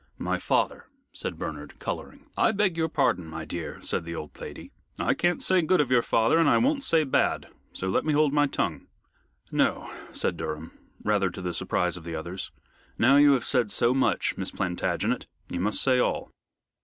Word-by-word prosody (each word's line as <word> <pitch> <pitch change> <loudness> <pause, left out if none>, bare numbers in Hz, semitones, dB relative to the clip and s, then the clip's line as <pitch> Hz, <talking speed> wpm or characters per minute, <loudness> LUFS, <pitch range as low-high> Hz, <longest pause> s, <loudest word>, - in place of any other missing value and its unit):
"My - - -1
father," - - 0 0.2
said - - -5
Bernard, - - -6
coloring. - - -6
"I 220 - +3
beg 195 -4 +1
your 160 -1 0
pardon, 90 - +1
my 80 0 -6
dear," 85 0 -5
said - - 0
the 85 0 -6
old 75 -2 -8
lady. - - -8 0.3
"I - - +2
can't 175 0 0
say 185 -1 +3
good 180 +3 +2
of 140 -4 +1
your 125 -2 +5
father, 115 +8 +3
and 165 -3 +5
I - - +5
won't 280 +2 +2
say 165 -11 +4
bad, 135 - +1 0.2
so 95 - -3
let 95 - +1
me 155 - +1
hold 150 -1 +3
my 145 0 +4
tongue." - - -2 0.6
"No," - - 0 0.2
said 85 - -1
Durham, 80 0 -5 0.3
rather 100 -3 +2
to 95 - -8
the 90 -1 -2
surprise 90 +1 0
of 85 - -10
the 85 0 -5
others. 85 +4 -5 0.5
"Now 130 +5 +5
you 145 0 +7
have 125 -4 0
said 125 -5 +1
so 120 +4 +2
much, 135 - +1
Miss - - -2
Plantagenet, 90 0 -1 0.2
you 90 - -3
must 105 +4 +1
say 130 -2 +4
all." - - 0
120 Hz, 195 wpm, -27 LUFS, -, 0.6 s, you